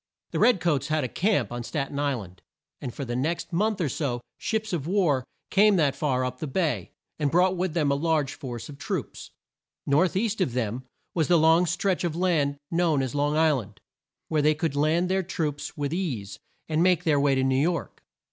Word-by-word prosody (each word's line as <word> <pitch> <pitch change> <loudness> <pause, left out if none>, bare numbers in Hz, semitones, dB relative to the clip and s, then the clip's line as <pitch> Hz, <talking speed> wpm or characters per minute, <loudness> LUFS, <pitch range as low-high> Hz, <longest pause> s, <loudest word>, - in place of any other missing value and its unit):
The - - -2
red 245 -6 +5
coats 145 -6 0
had 155 -1 0
a - - 0
camp 195 - 0
on 120 0 -4
Stat 140 +3 -3
en 140 - -5
Isl 140 -6 0
and, 90 0 -18 0.4
and 125 - -4
for 140 - -6
the 120 -1 -3
next 165 +7 -2
month 210 +4 +1
or 170 - +1
so 130 -2 -2 0.2
ships 220 -2 -2
of 155 -4 -2
war 170 -9 +2 0.3
came 205 +1 +5
that 145 -6 +2
far 135 -3 0
up 125 0 -5
the 155 - -3
bay, 160 +3 -1 0.3
and 145 -2 +1
brought 180 +4 +3
with 180 -2 -2
them 150 -4 +2
a - - +3
large 150 -1 0
force 120 -5 -7
of 145 -1 -11
troops. - - -4 0.6
North 155 +6 +2
east 220 0 0
of 130 -10 +1
them 125 +1 -2 0.3
was 160 -3 +1
the 175 - +5
long 165 +2 +5
stretch 185 +2 0
of 170 -3 -1
land 160 -6 +1
known 165 -5 +2
as 130 - -3
Long 145 +1 +1
Isl 155 -4 +3
and, 105 -1 -15 0.5
where 155 -2 +1
they 155 +1 +3
could 160 -2 -2
land 155 +5 +2
their 190 +1 +1
troops 155 -5 -4
with 145 +1 -2
ease, 130 - -3 0.3
and 155 0 +1
make 180 -1 +3
their 155 -4 +3
way 140 -1 +3
to 130 - +1
New 130 0 +2
York. 170 0 -2
155 Hz, 215 wpm, -26 LUFS, 140-175 Hz, 0.6 s, red